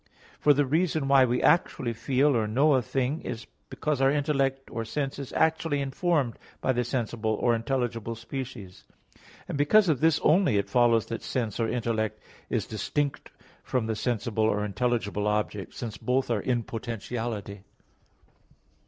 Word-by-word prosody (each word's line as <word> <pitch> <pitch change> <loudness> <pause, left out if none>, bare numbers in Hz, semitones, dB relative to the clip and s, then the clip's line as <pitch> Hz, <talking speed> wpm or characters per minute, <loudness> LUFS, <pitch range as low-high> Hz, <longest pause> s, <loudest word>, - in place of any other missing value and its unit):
For 150 - +5
the 145 0 +3
reason 155 0 +1
why 135 -1 +6
we 125 0 0
actually 130 -7 +2
feel 135 +5 +2
or 110 -2 +1
know 140 +8 +3
a 130 - +3
thing 135 +5 -1
is 115 +1 -6 0.2
because 150 -3 -2
our 135 - +5
intellect 135 -2 0
or 115 - -3
sense 135 +4 -3
is 140 - -6
actually 160 -2 +1
informed 140 -2 0 0.2
by 130 - +1
the 125 0 0
sensible 115 -3 -1
or 120 +2 +2
intelligible 115 -1 -2
species. 115 -5 -7 0.6
And 145 - -4
because 195 +7 +5
of 145 -5 +2
this 160 +1 +3
only, 160 - +4
it 100 0 -1
follows 115 -3 +4
that 115 - -5
sense 115 -5 -3
or 115 - +1
intellect 110 -3 -1 0.3
is - - 0
distinct 140 +7 -2 0.3
from 125 -3 -1
the 110 0 -1
sensible 110 -1 -1
or 105 -1 +1
intelligible 105 -1 -1
object, 105 -3 -2
since 115 -4 -5
both 130 0 0
are 110 -3 +1
in 120 -2 0
potentiality. 115 -3 -5
125 Hz, 160 wpm, -27 LUFS, 110-140 Hz, 0.6 s, why